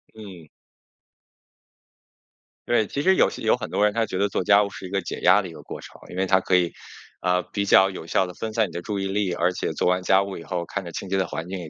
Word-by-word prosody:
嗯。 95 -7 -11 2.2
对， 120 -2 +3
其 140 - -3
实 190 +5 +4
有 - - +4
些 - - -9
有 - - +4
很 - - -6
多 105 - +2
人 105 - +2
他 115 0 +1
觉 95 - -5
得 100 +2 +2
做 95 - -2
家 100 +3 +5
务 100 - -1
是 95 - -9
一 - - -11
个 100 +1 -1
解 - - -6
压 105 - +5
的 95 - -7
一 85 - -10
个 - - -12
过 - - -8
程。 - - -14
因 - - -8
为 95 - +1
他 95 0 +3
可 95 - -2
以， 85 -2 0 0.5
呃， 90 0 +2
比 100 +4 -3
较 95 -1 +6
有 95 -4 -8
效 95 - +1
地 90 - -8
分 110 +5 -5
散 110 -1 +1
你 85 - -13
的 85 - -4
注 100 +1 -3
意 95 - -2
力。 95 -1 -1
而 - - +1
且 - - -3
做 - - -1
完 90 +1 +1
家 95 +1 +4
务 100 -1 -5
以 85 - -9
后， 85 -1 -3
看 95 +3 -4
着 85 - -8
清 95 - -6
洁 95 - -1
的 95 -1 +1
环 80 +3 -5
境， 95 +1 -5
也 85 -3 -8
95 Hz, 310 characters per minute, -24 LUFS, 90-100 Hz, 2.2 s, 较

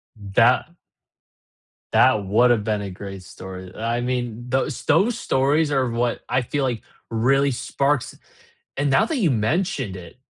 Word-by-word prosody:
That 115 +4 +3 1.3
that 105 -2 +4
would 115 +6 +4
have 115 -3 +2
been 105 -1 -1
a 100 -1 -5
great 95 0 -8
story, 95 0 -10
I 115 +2 -2
mean, 120 -1 -3
those 130 +2 -1
those 195 +10 +3
stories 145 +1 +1
are 130 -3 +1
what 120 +1 -1
I 130 - +1
feel 145 +4 -2
like 125 -4 -2 0.3
really 135 +5 +2
sparks 140 +2 -1 0.6
And 140 0 +1
now 135 - +4
that 320 - -2
you 185 - +2
mentioned 130 - -1
it, 90 +7 -11
120 Hz, 150 wpm, -22 LUFS, 105-140 Hz, 1.3 s, that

